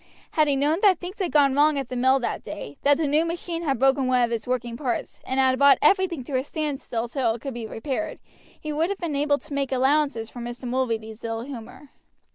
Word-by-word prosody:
Had 310 Hz, -1 st, +3 dB
he 285 Hz, -, +2 dB
known 295 Hz, +5 st, +1 dB
that 390 Hz, -4 st, +5 dB
things 365 Hz, +5 st, -8 dB
had 365 Hz, -4 st, -1 dB
gone 280 Hz, -3 st, +4 dB
wrong 295 Hz, +1 st, +4 dB
at 270 Hz, -3 st, -3 dB
the 255 Hz, -, -4 dB
mill 260 Hz, +2 st, +4 dB
that -, -, -3 dB
day, 145 Hz, -, -7 dB
that 285 Hz, 0 st, +4 dB
the 320 Hz, -, 0 dB
new 295 Hz, +3 st, +3 dB
machine 335 Hz, 0 st, -3 dB
had 280 Hz, -6 st, 0 dB
broken 270 Hz, +1 st, +3 dB
one 250 Hz, -1 st, +3 dB
of 235 Hz, -, 0 dB
its 230 Hz, 0 st, -3 dB
working 240 Hz, -2 st, -2 dB
parts 250 Hz, -1 st, -3 dB
and 260 Hz, +1 st, 0 dB
had 260 Hz, -1 st, +3 dB
brought 280 Hz, 0 st, +7 dB
everything 355 Hz, -3 st, +2 dB
to 260 Hz, 0 st, -1 dB
a -, -, -3 dB
standstill 280 Hz, -6 st, -3 dB
till 235 Hz, -2 st, 0 dB
it 235 Hz, -, -10 dB
could 275 Hz, -, -5 dB
be 230 Hz, -2 st, -5 dB
repaired, 265 Hz, +8 st, -4 dB, 0.4 s
he 305 Hz, -1 st, -4 dB
would 320 Hz, +4 st, +1 dB
have 400 Hz, -, -2 dB
been 335 Hz, -6 st, -3 dB
able 285 Hz, 0 st, +2 dB
to 305 Hz, 0 st, -11 dB
make 275 Hz, -1 st, -1 dB
allowances 265 Hz, -3 st, +1 dB
for 245 Hz, -, -9 dB
Mr. 240 Hz, +1 st, -6 dB
Mulready's 230 Hz, -3 st, -2 dB
ill 225 Hz, 0 st, -3 dB
humor. 255 Hz, +2 st, -10 dB
275 Hz, 240 wpm, -25 LUFS, 245-300 Hz, 0.4 s, brought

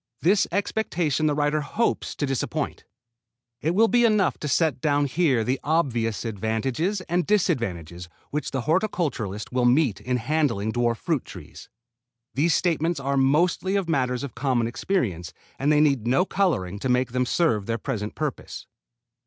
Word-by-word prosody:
This 195 Hz, +5 st, +3 dB
expectation 170 Hz, -6 st, 0 dB
the 150 Hz, -, +1 dB
writer 150 Hz, +1 st, +1 dB
hopes 225 Hz, +10 st, -1 dB
to 145 Hz, -, -1 dB
disappoint. 135 Hz, -2 st, -3 dB, 0.8 s
It 165 Hz, +4 st, 0 dB
will 225 Hz, +3 st, +5 dB
be 240 Hz, +1 st, +3 dB
enough 210 Hz, -5 st, +2 dB
to 150 Hz, -, -4 dB
set 145 Hz, -2 st, +1 dB
down 145 Hz, -1 st, +2 dB
here 140 Hz, -5 st, +1 dB
the 130 Hz, +4 st, -1 dB
obvious 120 Hz, -9 st, 0 dB
advantages 115 Hz, -, -1 dB
and 175 Hz, 0 st, 0 dB
disadvantages 90 Hz, -, -1 dB, 0.2 s
which 150 Hz, +1 st, -2 dB
the 135 Hz, -, -2 dB
horticulturist 150 Hz, -, -1 dB
will 125 Hz, -1 st, +1 dB
meet 125 Hz, -4 st, +3 dB
in 125 Hz, 0 st, -1 dB
handling 120 Hz, -5 st, 0 dB
dwarf 120 Hz, 0 st, 0 dB
fruit 160 Hz, -2 st, -1 dB
trees. -, -, -12 dB, 0.6 s
These 155 Hz, +5 st, +2 dB
statements 170 Hz, -2 st, 0 dB
are 140 Hz, 0 st, -1 dB
mostly 165 Hz, +8 st, +2 dB
of 195 Hz, -3 st, 0 dB
matters 130 Hz, -5 st, 0 dB
of 140 Hz, -, -6 dB
common 125 Hz, -2 st, 0 dB
experience 115 Hz, -, -2 dB, 0.3 s
and 145 Hz, +3 st, +2 dB
they 150 Hz, -, +4 dB
need 140 Hz, -7 st, +2 dB
no 135 Hz, +9 st, +3 dB
coloring 100 Hz, -, 0 dB
to 130 Hz, -, -2 dB
make 125 Hz, -1 st, +1 dB
them 125 Hz, 0 st, 0 dB
serve 120 Hz, -, +1 dB
their 115 Hz, 0 st, -1 dB
present 105 Hz, -3 st, -4 dB
purpose. -, -, -5 dB
140 Hz, 160 wpm, -24 LUFS, 120-165 Hz, 0.8 s, will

